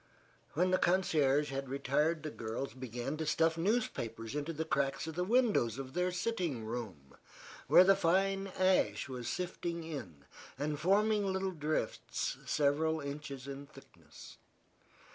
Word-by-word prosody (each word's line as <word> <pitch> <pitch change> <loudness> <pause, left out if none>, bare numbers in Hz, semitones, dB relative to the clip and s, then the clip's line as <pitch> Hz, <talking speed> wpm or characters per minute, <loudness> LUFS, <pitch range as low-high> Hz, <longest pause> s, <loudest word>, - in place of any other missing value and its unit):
When 180 +4 +2
the 185 - +3
concierge 150 -6 +2
had 135 -1 -4
retired 150 +4 +1
the 155 - -4
girls 115 +4 -4
began 130 +2 -4
to 160 - -2
stuff 160 +2 +3
newspapers 165 - -1
into 150 +2 -2
the 160 0 -3
cracks 140 -3 0
of 160 - -5
the 180 +3 -1
windows 210 - +2
of 135 -1 -6
their 180 +1 +1
sitting 175 - -2
room, 110 - -6 0.5
where 180 - +8
the 195 +1 +6
fine 195 +2 +2
ash 185 -4 +2
was 125 -3 -6
sifting 170 -1 -3
in 95 - -7 0.3
and 145 +1 -2
forming 205 +4 +3
little 190 0 -1
drifts 155 -2 -2
several 155 +2 +2
inches 140 -2 -6
in 140 +1 -7
thickness. - - -15
155 Hz, 145 wpm, -33 LUFS, 135-180 Hz, 0.5 s, where